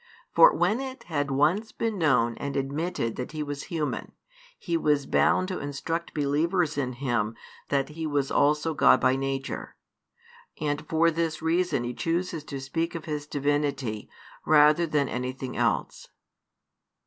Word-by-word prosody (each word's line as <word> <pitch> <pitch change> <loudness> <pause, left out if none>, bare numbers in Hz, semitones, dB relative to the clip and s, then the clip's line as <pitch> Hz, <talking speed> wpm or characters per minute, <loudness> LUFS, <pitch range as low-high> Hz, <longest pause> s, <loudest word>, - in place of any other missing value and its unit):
For - - +8
when 220 +4 +2
it 265 0 -6
had 145 -4 -2
once 155 +11 +1
been 225 -4 -2
known 120 -7 +3
and 140 -1 -3
admitted 140 -2 -2
that 125 +4 -5
He 155 -1 -2
was 145 -1 -5
human, 155 -4 -3 0.4
He 170 - -3
was 150 -3 +2
bound 185 - +2
to 185 - -3
instruct 165 +4 -4
believers 155 +3 +1
in 130 -3 -2
Him 120 -4 -1 0.3
that 140 0 +1
He 160 +1 -4
was 145 -2 0
also 150 +2 +2
God 135 -3 +5
by 130 - +3
nature; 135 0 -4 0.8
and 145 -1 -2
for 165 +1 +3
this 165 0 -2
reason 170 -4 +1
He 120 +1 -3
chooses 165 +2 -2
to 140 -2 -6
speak 165 +6 -3
of 165 - -6
His 150 -2 -4
divinity, 145 -6 -1 0.3
rather 150 +2 +5
than 150 -3 +1
anything 130 +1 -4
else. - - -1
150 Hz, 150 wpm, -27 LUFS, 135-165 Hz, 0.8 s, For